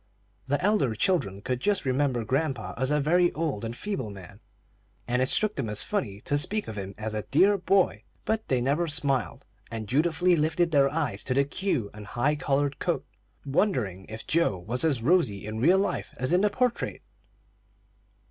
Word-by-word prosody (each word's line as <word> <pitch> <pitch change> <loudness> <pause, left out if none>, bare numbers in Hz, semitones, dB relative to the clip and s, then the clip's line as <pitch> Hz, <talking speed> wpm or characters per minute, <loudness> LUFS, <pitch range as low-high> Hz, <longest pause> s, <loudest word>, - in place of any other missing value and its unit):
The 145 +2 +1
elder 200 - +2
children 105 - 0
could 125 -1 -2
just 200 +3 0
remember 130 -3 0
grandpa 135 -1 -1
as 130 0 0
a 150 0 +2
very 175 +4 +3
old 155 -10 -2
and 115 +1 -4
feeble 165 - -3
man, 100 0 -11 0.7
and 125 +1 +1
it 130 - +2
struck 215 -1 +1
them 135 - -3
as 105 0 +1
funny 105 - -3
to 145 - 0
speak 210 +8 -1
of 110 - -6
him 100 -1 -6
as 110 0 -4
a 105 - -1
"dear 195 +8 +5
boy;" 195 0 +2 0.2
but 220 0 -1
they 130 -2 +1
never 145 +7 +1
smiled, 140 -5 0 0.2
and 110 -1 -5
dutifully 170 - +2
lifted 160 +2 +1
their 140 -2 +4
eyes 140 -9 -2
to 130 - 0
the 140 - +4
queue 140 - -2
and 105 0 -10
the - - -12
high 145 +5 +2
collared 145 -1 0
coat, - - -1 0.4
wondering 125 - 0
if 110 +1 -7
Joe 165 - +1
was 110 - -3
as 140 -8 +1
rosy 125 - +2
in 110 +1 -4
real 175 +8 +5
life 200 +1 -2
as 130 +6 -1
in 180 - +4
the 210 - +3
portrait. 250 +3 -1
140 Hz, 190 wpm, -27 LUFS, 115-175 Hz, 0.7 s, dear